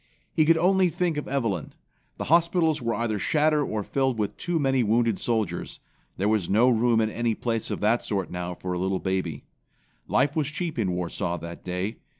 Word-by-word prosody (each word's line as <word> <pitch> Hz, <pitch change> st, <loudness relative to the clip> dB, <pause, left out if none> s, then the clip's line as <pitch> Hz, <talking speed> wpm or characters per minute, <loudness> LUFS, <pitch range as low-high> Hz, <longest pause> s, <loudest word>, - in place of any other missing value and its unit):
He 155 Hz, -, +3 dB
could 165 Hz, +1 st, +5 dB
only 185 Hz, +2 st, +3 dB
think 170 Hz, 0 st, -1 dB
of 150 Hz, -, -4 dB
Evelyn. 115 Hz, -, -2 dB, 0.4 s
The -, -, -3 dB
hospitals 165 Hz, -1 st, +3 dB
were 115 Hz, -1 st, -1 dB
either 110 Hz, -3 st, -1 dB
shattered 150 Hz, +4 st, +2 dB
or 105 Hz, -1 st, -2 dB
filled 130 Hz, +1 st, 0 dB
with 105 Hz, -2 st, -2 dB
too 175 Hz, -1 st, -2 dB
many 135 Hz, -3 st, +2 dB
wounded 115 Hz, -1 st, +2 dB
soldiers. 110 Hz, -7 st, -2 dB, 0.4 s
There 100 Hz, -, 0 dB
was 105 Hz, -5 st, +1 dB
no 115 Hz, +6 st, +4 dB
room 115 Hz, 0 st, +3 dB
in 110 Hz, -1 st, +1 dB
any 115 Hz, -1 st, 0 dB
place 115 Hz, -1 st, -2 dB
of -, -, -3 dB
that 110 Hz, +3 st, +2 dB
sort 100 Hz, -4 st, -2 dB
now 90 Hz, 0 st, -4 dB
for 90 Hz, +1 st, -4 dB
a 90 Hz, -, -2 dB
little 95 Hz, +1 st, 0 dB
baby. 95 Hz, -6 st, -2 dB, 0.6 s
Life 140 Hz, +3 st, +2 dB
was 155 Hz, -4 st, +1 dB
cheap 155 Hz, -1 st, -3 dB
in 95 Hz, -5 st, 0 dB
Warsaw 90 Hz, 0 st, -2 dB
that 85 Hz, +1 st, -8 dB
day. 90 Hz, +5 st, -3 dB
115 Hz, 195 wpm, -26 LUFS, 95-145 Hz, 0.6 s, could